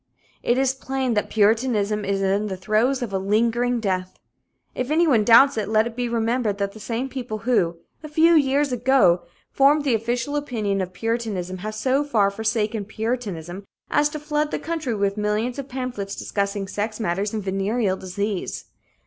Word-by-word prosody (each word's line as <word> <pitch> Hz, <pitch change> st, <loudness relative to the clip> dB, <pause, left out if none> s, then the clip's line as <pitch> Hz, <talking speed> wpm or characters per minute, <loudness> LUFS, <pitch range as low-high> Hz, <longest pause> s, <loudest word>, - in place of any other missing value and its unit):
It 240 Hz, -, +1 dB
is 265 Hz, 0 st, +2 dB
plain 265 Hz, -1 st, -2 dB
that 210 Hz, -, 0 dB
puritanism 215 Hz, -1 st, +2 dB
is 195 Hz, 0 st, 0 dB
in 200 Hz, +2 st, +1 dB
the 190 Hz, -2 st, -4 dB
throes 225 Hz, +7 st, +1 dB
of 215 Hz, -5 st, -5 dB
a 190 Hz, -, +1 dB
lingering 235 Hz, +5 st, +1 dB
death. 185 Hz, -3 st, -2 dB, 0.6 s
If 255 Hz, +1 st, -3 dB
anyone 305 Hz, -8 st, +3 dB
doubts 240 Hz, +4 st, +6 dB
it, 210 Hz, -, -3 dB
let 215 Hz, 0 st, +3 dB
it 235 Hz, -1 st, -6 dB
be 245 Hz, -1 st, -2 dB
remembered 230 Hz, -2 st, 0 dB
that 200 Hz, -1 st, -1 dB
the 220 Hz, -, -12 dB
same 235 Hz, +4 st, -3 dB
people 250 Hz, -5 st, -5 dB
who, 175 Hz, -9 st, +2 dB, 0.2 s
a 310 Hz, -, -8 dB
few 325 Hz, +3 st, +4 dB
years 285 Hz, -2 st, +3 dB
ago, 240 Hz, -8 st, +3 dB, 0.3 s
formed 285 Hz, +2 st, +4 dB
the 275 Hz, -4 st, +1 dB
official 240 Hz, +5 st, -1 dB
opinion 220 Hz, -9 st, -1 dB
of 185 Hz, -1 st, -4 dB
puritanism 200 Hz, -4 st, -3 dB
have 215 Hz, +3 st, -5 dB
so 265 Hz, +5 st, +1 dB
far 215 Hz, -9 st, +2 dB
forsaken 220 Hz, 0 st, -1 dB
puritanism 205 Hz, -6 st, -4 dB, 0.3 s
as 295 Hz, 0 st, +3 dB
to 305 Hz, -, -6 dB
flood 300 Hz, 0 st, -1 dB
the -, -, -2 dB
country 315 Hz, -7 st, -3 dB
with 200 Hz, 0 st, 0 dB
millions 215 Hz, +5 st, -1 dB
of 275 Hz, 0 st, -6 dB
pamphlets 245 Hz, -6 st, -4 dB
discussing 200 Hz, -1 st, -2 dB
sex 210 Hz, +3 st, -3 dB
matters 200 Hz, 0 st, -1 dB
and 215 Hz, -2 st, -3 dB
venereal 195 Hz, +2 st, 0 dB
disease. 195 Hz, +1 st, -4 dB
225 Hz, 175 wpm, -23 LUFS, 200-255 Hz, 0.6 s, doubts